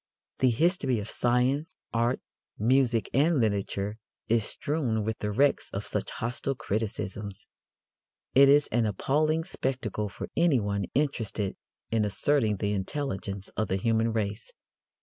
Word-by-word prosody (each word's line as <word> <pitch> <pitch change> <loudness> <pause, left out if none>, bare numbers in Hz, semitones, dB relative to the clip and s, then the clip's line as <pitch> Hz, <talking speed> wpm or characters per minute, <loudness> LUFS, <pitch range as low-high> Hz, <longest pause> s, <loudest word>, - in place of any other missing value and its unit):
The 130 - +5
history 140 -1 +2
of 105 0 -5
science, 125 +5 +1 0.2
art, 120 +2 +1 0.4
music 120 0 +3
and 150 +3 +3
literature 100 -1 -1 0.3
is 115 -1 +3
strewn 130 -8 -1
with 110 +1 -3
the 105 - -2
wrecks 140 +6 +2
of - - -4
such - - -2
hostile 120 +4 -2
criticisms. 100 -2 -3 0.9
It 135 +1 +7
is 145 +1 +6
an 115 -1 +2
appalling 155 - +1
spectacle 125 - -3
for - - -7
anyone 105 - +2
interested 115 -8 -1 0.4
in 110 -1 +2
asserting 110 +2 +2
the 100 +1 -1
intelligence 100 -3 -3
of 110 - -2
the 95 - 0
human 115 +3 +1
race. 105 0 -3
115 Hz, 130 wpm, -28 LUFS, 105-135 Hz, 0.9 s, It